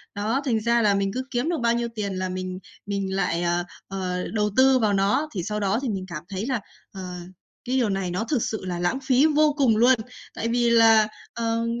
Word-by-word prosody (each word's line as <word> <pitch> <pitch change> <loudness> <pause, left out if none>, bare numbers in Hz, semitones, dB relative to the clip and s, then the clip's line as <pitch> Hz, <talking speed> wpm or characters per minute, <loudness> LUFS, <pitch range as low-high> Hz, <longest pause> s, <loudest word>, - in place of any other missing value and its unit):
Đó, 220 +7 0
thành 230 -5 +1
ra 235 +2 +2
là 205 -2 +3
mình 195 0 0
cứ 255 +2 -2
kiếm 245 +6 0
được 345 - 0
bao 235 0 +3
nhiêu 235 0 -1
tiền 200 -3 -3
là 185 0 -2
mình 185 0 -4 0.3
mình 195 -1 -2
lại 180 -3 0
ờ, 175 0 +1 0.2
ờ, 185 -2 -3
đầu 210 -1 +1
tư 260 0 +6
vào 215 -3 +2
nó, 200 +10 +1
thì 180 - -2
sau 210 +3 -3
đó 200 +2 +1
thì 270 - -2
mình 195 -3 -3
cảm 170 -4 -7
thấy 195 +2 -4
là, 255 -2 -1 0.3
ờ, 180 -2 -7 0.5
cái 255 +1 -1
điều 240 -5 +2
này 195 -2 -2
nó 185 +5 -1
thực 245 +1 -1
sự 220 -3 -4
là 175 -2 -3
lãng 175 +9 0
phí 265 +1 +4
vô 305 -1 +3
cùng 245 -7 +3
luôn! 245 +3 +6 0.4
Tại 230 - -3
vì 240 0 +2
là, 225 -2 +6 0.3
ờ, 230 0 -1
215 Hz, 235 wpm, -24 LUFS, 190-240 Hz, 0.5 s, tư